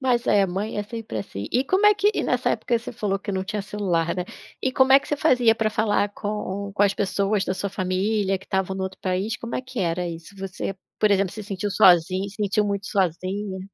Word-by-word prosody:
Mas 250 -3 +1
é, 200 -1 +4
mãe 195 +4 -3
é - - 0
sempre, 220 - -6
assim. 100 0 -6
E 255 +3 +2
como 380 +8 +3
é 420 - +7
que 410 +1 +3
e - - 0
nessa - - +1
época 235 -2 0
você 240 - -8
falou 205 -4 -1
que 200 +1 -5
não 190 0 -2
tinha 210 +1 -3
celular, 185 -5 -1
né, 180 - -2 0.4
e 260 - 0
como 265 +1 +4
é 270 - +8
que - - -13
você 295 - 0
fazia, 250 -7 +4
para 220 -1 0
falar 210 -1 +1
com 200 -1 -4
com 205 - +2
as 200 -1 +4
pessoas 200 +1 0
da 185 - -1
sua 200 +1 -3
família, 195 +1 0
que 195 - -16
estavam 190 0 -1
no 190 - -3
outro 190 0 -6
país, 190 +5 -1
como 235 -1 -6
é - - -2
que 255 -2 -8
era 175 0 0
isso? 165 +3 -9
Você, 195 0 -4 0.2
por 215 - +3
exemplo, 195 -2 +2
se 215 +1 -7
sentiu 205 0 -3
sozinha, 185 0 +4
se 200 - -13
sentiu 210 0 +1
muito 200 0 -2
sozinha 190 +2 -1
200 Hz, 240 wpm, -24 LUFS, 190-220 Hz, 0.4 s, é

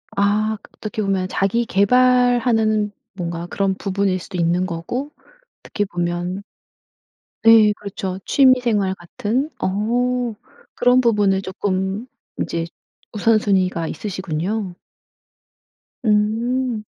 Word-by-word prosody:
아 210 +2 +1
그 - - -18
어떻게 215 0 -4
보면 195 -2 0
자기 200 +6 0
계발하는 230 -1 +3 0.2
뭔가 170 -2 -4
그런 195 +1 0
부분일 195 -1 -1
수도 180 +1 -8
있는 175 +2 +1
거고 240 - -4 0.5
어떻게 205 - -3
보면 175 +1 -3 1.0
네. 225 -2 +7
그렇죠. 190 -2 -5
취미생활 240 -8 +3
같은 215 - -2
어 240 +4 0 0.4
그런 250 +1 +4
부분을 205 -5 +2
쪼끔 190 +3 -2 0.3
이제 165 0 -2 0.5
우선순위가 195 -6 +2
있으시군요. 185 +1 -3 1.3
음. 225 +2 +1
205 Hz, 220 characters per minute, -20 LUFS, 185-230 Hz, 1.3 s, 네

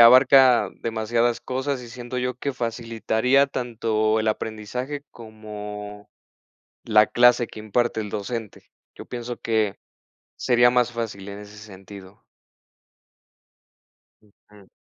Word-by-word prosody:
abarca 125 -2 +7
demasiadas 115 +1 0
cosas 130 +1 -3
y 120 - -10
siento 120 +1 -6
yo 125 0 -2
que 140 +3 -3
facilitaría 115 +2 +1
tanto 110 -4 0
el 110 - 0
aprendizaje 115 +7 -4
como 105 -2 -9 0.8
la 110 -1 +5
clase 120 +1 +4
que - - -12
imparte 110 +2 0
el 105 - -5
docente. 110 +1 -6 0.2
Yo - - -10
pienso 120 0 -6
que 110 -3 0 0.6
sería 120 -1 +4
más 125 -1 +2
fácil 110 -4 -5
en 100 - -8
ese 105 0 -12
sentido. 100 -1 -13 2.0
Ujú. 105 -1 -22
115 Hz, 115 wpm, -24 LUFS, 105-125 Hz, 2.0 s, abarca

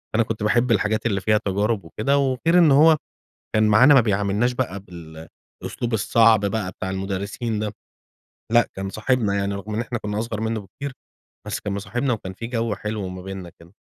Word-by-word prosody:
أنا 115 - +4
كنت 110 -1 -4
باحب 120 +3 +2
الحاجات 110 +1 +1
اللي 100 -4 0
فيها 105 +1 +2
تجارب 100 0 0
وكده، 110 +11 0
وغير 140 +5 +2
إنه 150 -5 +6
هو 160 -1 +6 0.6
كان 110 0 +4
معانا 125 +7 +7
ما 135 - +8
بيعاملناش 105 +2 +1
بقى 120 -6 -3
بالأسلوب 85 +6 -9
الصعب 110 +1 +4
بقى 100 -2 -2
بتاع 95 - -5
المدرسين 100 +4 -3
ده. 105 -1 -3 0.8
لأ، 120 0 +4
كان 95 0 -4
صاحبنا 110 -1 0
يعني، 100 0 -1
رغم 100 +2 -6
إن 110 - -1
إحنا 120 0 -3
كُنَّا 105 0 -4
أصغر 110 -1 -3
منه 110 0 -1
بكتير، 135 +9 -8 0.5
بس - - -3
كان 100 - -4
مصاحبنا 120 +6 -2
وكان 95 -4 -4
في 115 +5 -7
جو 115 -2 -1
حلو 105 -2 -4
ما 90 0 -8
بيننا 95 -2 -7
كده. 85 +1 -17
110 Hz, 185 wpm, -23 LUFS, 100-120 Hz, 0.8 s, ما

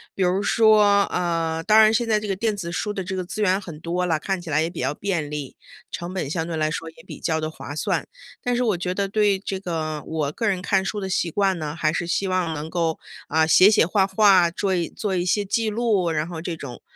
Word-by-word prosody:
比 190 - 0
如 185 +2 +1
说 210 -3 +5
呃， 165 -2 -1
当 215 +4 +5
然 215 0 +5
现 235 0 +1
在 215 -1 +3
这 210 - -6
个 195 - 0
电 215 +1 -1
子 170 -4 -5
书 210 +4 -2
的 190 - -4
这 190 +1 -4
个 185 - -2
资 215 - -5
源 190 -1 +3
很 170 -6 -9
多 180 +2 -1
了， 160 -3 +1
看 190 +2 -2
起 170 - -9
来 155 +1 +2
也 165 - 0
比 170 - -9
较 - - 0
便 170 -5 -2
利， 150 -3 -6 0.3
成 175 +2 -5
本 175 -7 -3
相 160 0 -2
对 165 - -3
来 155 0 +1
说 165 0 -4
也 160 0 -17
比 - - -9
较 160 -1 -1
地 155 - -2
划 145 -2 -8
算。 - - -1 0.4
但 245 0 0
是 250 - +1
我 215 -7 +1
觉 180 +1 -2
得 200 +1 -1
对 205 -2 +2
这 190 0 -5
个， 160 -4 -3
我 155 -3 -2
个 225 +9 -2
人 190 -3 0
看 195 0 +1
书 205 +2 -3
的 190 - -4
习 180 -1 0
惯 195 0 +1
呢， 150 0 -4
还 155 -2 +1
是 170 - -2
希 195 +2 0
望 180 -3 0
能 150 +1 -5
够， 165 -2 -1 0.3
啊， 160 +1 +2
写 185 +4 +7
写 210 -5 +4
画 190 +2 +2
画， 195 -3 +5
桌 190 +2 -1
一 170 -2 -1
做 205 -3 -3
一 175 0 0
些 205 +3 +1
记 220 +3 0
录， 210 -5 +1
然 155 -1 -1
后 165 -2 -6
这 170 -1 -4
种 135 -5 -9
180 Hz, 285 characters per minute, -23 LUFS, 160-200 Hz, 0.4 s, 写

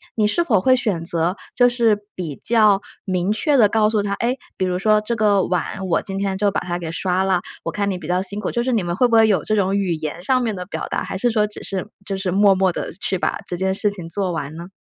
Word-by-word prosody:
你 215 - +2
是 340 +11 +1
否 220 - +3
会 255 +5 +5
选 210 -9 -1
择 170 +1 0 0.2
就 245 0 +5
是 235 -3 +2 0.2
比 165 -6 -5
较 215 -4 +4 0.2
明 185 +1 0
确 285 +6 +2
地 220 -5 +6
告 215 0 +3
诉 215 -1 +1
她， 200 0 -2
哎， 235 +4 0 0.2
比 185 - -1
如 180 -1 -1
说： 215 +2 +4
“这 215 +3 -2
个 205 -3 +3
碗 185 +2 -2
我 170 - +1
今 195 -1 -4
天 195 -1 -1
就 205 0 +2
把 - - -1
它 175 -1 -3
给 170 -2 -5
刷 185 +2 0
了， 185 -2 +1 0.2
我 - - -3
看 200 -1 -1
你 185 - -3
比 165 -4 -9
较 180 +1 +1
辛 200 +2 -4
苦。” - - -2
就 235 - 0
是 260 - 0
你 225 -5 +2
们 175 0 -2
会 250 - +3
不 230 - +2
会 225 -1 +6
有 190 -8 +2
这 215 - 0
种 195 -1 +1
语 195 -4 0
言 155 +2 -5
上 255 +4 +2
面 225 -4 -1
的 180 - -6
表 195 - -5
达， - - -2
还 - - -4
是 240 +5 +1
说 215 -2 +2
只 210 - -10
是 190 -2 -3 0.2
就 195 - -3
是 190 -2 -2
默 200 0 +5
默 190 -1 +2
地 - - -5
去 190 - 0
把 - - -1
这 175 - -5
件 190 +1 0
事 210 +2 0
情 180 -5 -7
做 185 +1 -1
完 155 -2 -4
呢？ 170 +1 -8
195 Hz, 305 characters per minute, -21 LUFS, 180-215 Hz, 0.2 s, 地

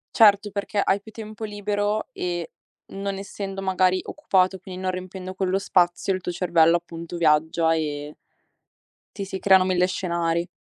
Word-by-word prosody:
Certo, 205 -2 +5
perché 200 0 -1
hai 195 - +2
più 220 +1 -14
tempo 215 0 -7
libero 205 0 -1
e, 175 -2 -4 0.4
non 195 0 -4
essendo 195 0 -6
magari 185 -1 +2
occupato, 190 -9 +1
quin 185 0 -9
non 185 0 0
riempiendo 185 0 -7
quello 190 0 0
spazio, 180 0 +2
il 185 - -2
tuo 175 - -4
cervello 170 -2 +4
appunto 170 0 -5
viaggia 160 0 +3
e 150 -2 -3 1.0
ti 200 - -4
si 190 0 -5
creano 190 -1 +5
1000 180 -1 +2
scenari. 170 -2 -1
185 Hz, 155 wpm, -24 LUFS, 175-200 Hz, 1.0 s, Certo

